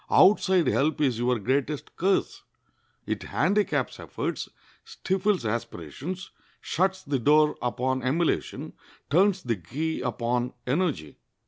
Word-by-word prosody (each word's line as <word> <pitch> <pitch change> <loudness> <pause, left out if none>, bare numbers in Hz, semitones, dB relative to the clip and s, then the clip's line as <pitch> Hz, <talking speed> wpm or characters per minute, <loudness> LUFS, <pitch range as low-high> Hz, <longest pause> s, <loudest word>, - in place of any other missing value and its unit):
Outside 190 -3 +5
help 150 +3 +1
is 130 -6 +1
your 125 0 +2
greatest 135 +6 -2
curse. 190 +2 0 0.6
It - - -2
handicaps 205 +2 0
efforts, - - -4 0.3
stifles 195 - -1
aspirations, 120 - -5 0.3
shuts 190 +2 0
the 140 -2 -1
door 150 +4 +4
upon 130 +2 -1
emulation, 150 +7 -1 0.4
turns 190 +4 +3
the 115 -3 -1
key 145 - -3
upon 120 +1 -1
energy." 135 - -1
145 Hz, 110 wpm, -26 LUFS, 125-185 Hz, 0.6 s, Outside